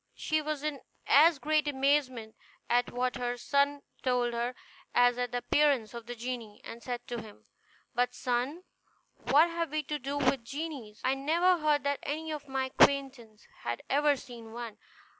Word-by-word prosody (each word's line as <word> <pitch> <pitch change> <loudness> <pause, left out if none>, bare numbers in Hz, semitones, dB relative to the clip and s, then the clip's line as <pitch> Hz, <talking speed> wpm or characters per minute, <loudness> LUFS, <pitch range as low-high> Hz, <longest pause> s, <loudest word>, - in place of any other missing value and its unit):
She 310 0 0
was 300 -1 -3
in 300 -3 -3 0.2
as 310 +3 +6
great 305 +1 +1
amazement 265 -5 +1 0.4
at 245 0 +2
what 250 0 -1
her 245 0 -2
son 280 +2 +1 0.2
told 245 -2 +1
her 240 +1 -2 0.4
as 245 0 +4
at 245 -1 -1
the 245 - -1
appearance 250 -3 +2
of 235 -1 -8
the 245 - -5
genie; 235 -3 -6
and 230 +1 -9
said 245 -1 -5
to 240 -2 -3
him, 215 -2 -14 0.5
"But, 245 0 +1
son, 255 +7 -1 0.6
what 290 +7 +6
have 335 -1 -2
we 305 +1 -1
to 295 +1 -3
do 280 +2 -3
with 265 -3 +2
genies? 270 -5 -6
I 260 +1 +2
never 335 +6 +2
heard 300 -2 +2
that 280 -1 0
any 315 +2 -3
of 295 -2 -6
my 265 -1 -1
acquaintance 265 -6 +2
had 120 0 -4
ever 290 +1 +4
seen 235 -4 -11
one. 230 -2 -7
265 Hz, 175 wpm, -30 LUFS, 240-295 Hz, 0.6 s, as